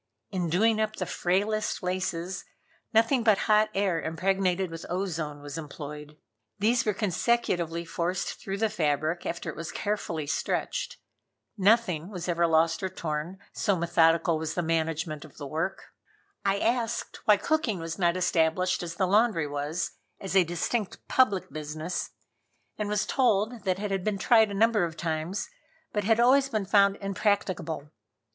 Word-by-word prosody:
In 180 -4 -1
doing 220 +6 +3
up 215 0 -1
the 185 - -3
frailest 200 +5 0
laces, 180 -1 -2 0.5
nothing 230 +3 +3
but 215 -3 +5
hot 215 0 +4
air 190 -4 +1
impregnated 185 +2 0
with 165 0 -7
ozone 160 -6 -3
was 145 +2 -6
employed. 150 0 -8 0.4
These 235 +4 +2
were 210 - +2
consecutively 175 -5 0
forced 175 +2 -2
through 195 0 -4
the 220 +1 +1
fabric 155 -2 0
after 170 0 -4
it - - -13
was 165 +1 -5
carefully 185 -7 -2
stretched. - - -2 0.6
Nothing 195 -5 +2
was 180 -4 -6
ever 170 -1 +2
lost 165 +2 +3
or 190 - -1
torn, 165 0 -4 0.2
so 200 - +1
methodical 170 -1 +3
was 160 0 -3
the 175 - 0
management 160 -2 -1
of 155 - -15
the 145 - -6
work. 160 +7 -4 0.5
I 195 0 +2
asked 230 +1 -1
why 210 -1 +6
cooking 305 -4 0
was 165 0 -5
not 175 -1 +2
established 175 0 +1
as 170 -1 -5
the 190 - +1
laundry 205 -3 +3
was, 145 +4 -2 0.3
as 195 0 -4
a 190 - +7
distinct 175 +5 -3
public 215 -8 +2
business, 155 +3 -4 0.7
and 210 -1 -3
was 210 -1 +1
told 230 -2 +1
that 185 -1 +1
it 205 0 -3
had 195 -2 -1
been 210 0 0
tried 220 +2 +5
a 200 - -4
number 220 -1 +3
of 165 -1 -3
times, 165 +3 -2 0.5
but 210 -2 -1
had 225 +1 +3
always 265 +3 +5
been 215 -5 -1
found 200 0 +4
impracticable. 195 -6 -1
185 Hz, 160 wpm, -28 LUFS, 165-210 Hz, 0.7 s, a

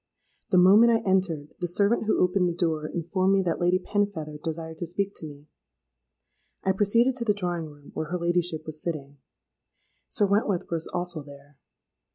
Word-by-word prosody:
The 185 - +3
moment 205 +6 +7
I 225 -3 +1
entered, 180 -6 0
the 175 - -1
servant 200 +6 +2
who 215 - +2
opened 180 0 +2
the - - -2
door 160 -3 -1
informed 185 +4 0
me 195 -1 +3
that 170 -2 -1
Lady 175 +1 +3
Penfeather 185 -7 -2
desired 160 0 -5
to 175 - -3
speak 200 +4 -2
to 160 - -6
me. 145 0 -12 1.2
I 190 - +2
proceeded 225 +6 +3
to 240 - -1
the 210 -3 +2
drawing 175 -4 -3
room, 145 -1 -15
where 155 - -3
her 180 - -2
ladyship 170 -2 0
was 155 -1 -7
sitting. 145 -4 -5 0.9
Sir 205 - +2
Wentworth 200 -3 0
was 165 -1 -1
also 175 -2 -3
there. 140 -1 -15
175 Hz, 180 wpm, -26 LUFS, 155-195 Hz, 1.2 s, moment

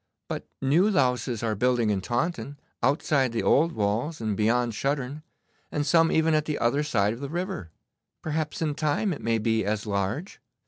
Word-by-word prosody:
'But - - -5 0.2
new 165 +10 +4
louses 125 - +1
are 110 -2 +1
building 120 0 +2
in 100 -2 0
Taunton, 140 - -2 0.2
outside 135 0 +2
the 115 - -1
old 165 +4 +4
walls, 110 +8 -1
and 110 -2 -1
beyond 115 +3 +2
Shuttern, 140 +3 -2 0.5
and 145 -1 -1
some 165 +3 +4
even 160 0 +3
at 155 -1 +2
the 150 -2 -2
other 120 +5 +1
side 110 -9 +1
of 115 - -9
the 140 0 -5
river. 175 - -4 0.5
Perhaps 155 0 -2
in 150 -2 0
time 155 +6 0
it - - -8
may 115 0 +1
be 110 0 +1
as 105 +2 -1
large. 105 - -3
135 Hz, 180 wpm, -26 LUFS, 115-155 Hz, 0.5 s, new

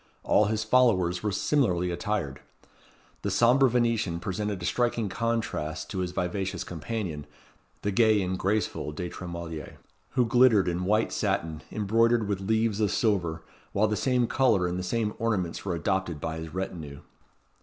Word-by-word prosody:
All 105 - +4
his 110 +1 0
followers 105 -7 +3
were 105 - -1
similarly 95 -5 +1
attired. 85 -6 -2 0.8
The 100 - -2
sombre 120 +7 +4
Venetian 115 -7 +1
presented 100 +1 -3
a 85 - -5
striking 120 0 0
contrast 115 -8 -2
to 95 - -3
his 90 -1 -1
vivacious 90 +2 -2
companion, 85 -4 -5 0.6
the 105 - 0
gay 110 +1 +4
and 95 0 -1
graceful 100 -4 -1
De 90 +3 -4
Tremouille, 85 -3 -7 0.4
who 125 -1 +3
glittered 115 -4 +5
in 90 +1 -1
white 105 +3 +2
satin, 85 -7 -1
embroidered 115 +2 +2
with 100 -2 -2
leaves 110 +1 +1
of 105 -2 +2
silver, 85 -8 0 0.3
while 105 +2 +3
the 105 - 0
same 125 +1 +2
colour 115 -7 +2
and 90 +1 -2
the - - -3
same 105 +3 -1
ornaments 100 -7 -1
were 90 -3 -1
adopted 90 -1 -1
by 80 +2 -3
his 80 0 -7
retinue. 80 -6 -5
100 Hz, 155 wpm, -27 LUFS, 90-115 Hz, 0.8 s, glittered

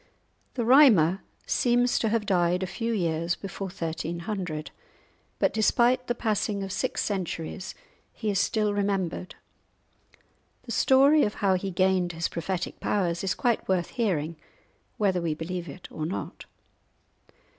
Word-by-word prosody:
The 240 -3 -1
Rhymer 220 - +6 0.2
seems 245 0 +2
to 225 - +1
have 220 -1 0
died 180 -2 +2
a - - 0
few 230 +5 -3
years 170 -4 0
before 195 0 -6
1300; 170 -1 -4 0.7
but - - +1
despite 240 +3 +2
the 240 - 0
passing 210 -3 -1
of 195 - -5
six - - -1
centuries 185 -2 -4 0.4
he 215 -3 -2
is 195 - +1
still 210 +1 +1
remembered. 195 -3 -2 1.3
The - - -8
story 280 +3 +5
of 210 - -1
how 195 -2 +2
he 185 +1 -1
gained 185 -1 +1
his 165 +1 -2
prophetic 175 +2 -4
powers 175 -4 0
is 185 -1 0
quite 240 -2 0
worth 185 -2 0
hearing, 170 - -1 0.6
whether 190 -4 +1
we 165 -2 -1
believe 170 +1 -5
it 175 +6 -10
or 155 -1 -4
not. 185 - -6
190 Hz, 140 wpm, -27 LUFS, 170-215 Hz, 1.3 s, Rhymer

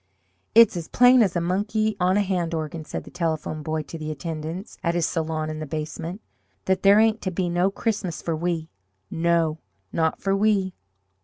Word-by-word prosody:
"It's 230 -3 +7
as 170 -2 -4
plain 250 0 +6
as 195 -5 +2
a - - +2
monkey 210 +5 0
on 185 +2 +3
a - - +4
hand 175 -4 -1
organ," 155 0 -4
said - - -5
the - - -13
Telephone 160 -2 -2
Boy 155 +1 -2
to 165 +3 -9
the 155 0 -4
attendants 160 +5 -6
at 170 0 0
his 175 - +2
salon 155 -1 -2
in 155 - -5
the 155 - -5
basement, 160 +6 -5 0.4
"that 190 0 +1
there 200 +1 +6
ain't 220 0 +3
to 185 - -1
be 180 0 -1
no 175 +2 +2
Christmas 195 -7 -2
for 165 - -2
we 165 -1 -2 0.4
no, 165 -1 +1 0.3
not 160 -1 +1
for 195 0 +1
we!" 195 -2 +2
170 Hz, 190 wpm, -24 LUFS, 160-195 Hz, 0.4 s, It's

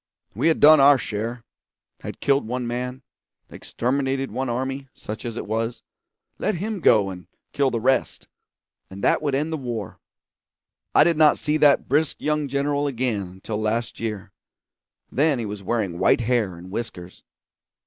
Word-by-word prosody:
We 120 +10 0
had 165 - +3
done 155 +1 +8
our 140 0 +7
share; 115 +1 -4 0.6
had - - -8
killed 140 -4 +2
one 125 +1 -3
man, 125 +2 -4 0.5
exterminated 135 +2 -2
one 130 -1 -2
army, 135 +3 -3
such 110 +3 -7
as 120 -1 -5
it - - -4
was; 115 +3 -3 0.6
let - - 0
him 205 +4 -3
go 105 - +4
and 90 -1 -10 0.3
kill 140 -1 +2
the 120 - -2
rest, 130 +3 0 0.6
and 95 +1 -10
that - - +3
would 145 -3 0
end 155 +4 -1
the - - -1
war. 120 -7 -5 1.0
I - - +8
did 170 -2 +2
not 155 -1 +5
see 150 +1 0
that 145 -2 +4
brisk 150 +3 +1
young 150 -1 -1
general 140 +1 0
again 125 -5 -1
until 105 +3 -5
last 115 +2 -2
year; 110 -4 -5 0.8
then 145 0 +2
he 115 - -3
was 105 -1 -6
wearing 100 -4 -2
white - - +3
hair 115 -6 0
and 90 +2 -11
whiskers. 95 -5 -6
125 Hz, 165 wpm, -23 LUFS, 110-140 Hz, 1.0 s, done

